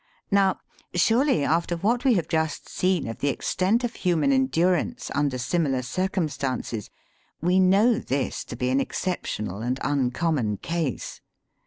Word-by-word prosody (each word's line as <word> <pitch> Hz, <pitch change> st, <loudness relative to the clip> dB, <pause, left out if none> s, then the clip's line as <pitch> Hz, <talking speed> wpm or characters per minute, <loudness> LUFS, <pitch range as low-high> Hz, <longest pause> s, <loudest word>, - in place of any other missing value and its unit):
Now, 195 Hz, -1 st, +3 dB, 0.4 s
surely 225 Hz, -, +3 dB
after 170 Hz, +3 st, +1 dB
what 235 Hz, +8 st, 0 dB
we 255 Hz, -4 st, +5 dB
have 175 Hz, -, 0 dB
just 160 Hz, -1 st, -1 dB
seen 180 Hz, -6 st, 0 dB
of 115 Hz, -, -6 dB
the 145 Hz, -, 0 dB
extent 190 Hz, -, 0 dB
of 240 Hz, -1 st, -2 dB
human 180 Hz, -, +2 dB
endurance 240 Hz, -5 st, +1 dB
under 140 Hz, -2 st, 0 dB
similar 135 Hz, 0 st, 0 dB
circumstances, 140 Hz, -, -2 dB, 0.5 s
we 180 Hz, +3 st, +2 dB
know 200 Hz, +5 st, +4 dB
this 135 Hz, -1 st, -2 dB
to -, -, -7 dB
be 125 Hz, +1 st, -1 dB
an 135 Hz, -, +3 dB
exceptional 110 Hz, -, -3 dB
and 125 Hz, +3 st, -2 dB
uncommon 135 Hz, -4 st, 0 dB
case. 165 Hz, -, -3 dB
165 Hz, 140 wpm, -25 LUFS, 135-190 Hz, 0.5 s, we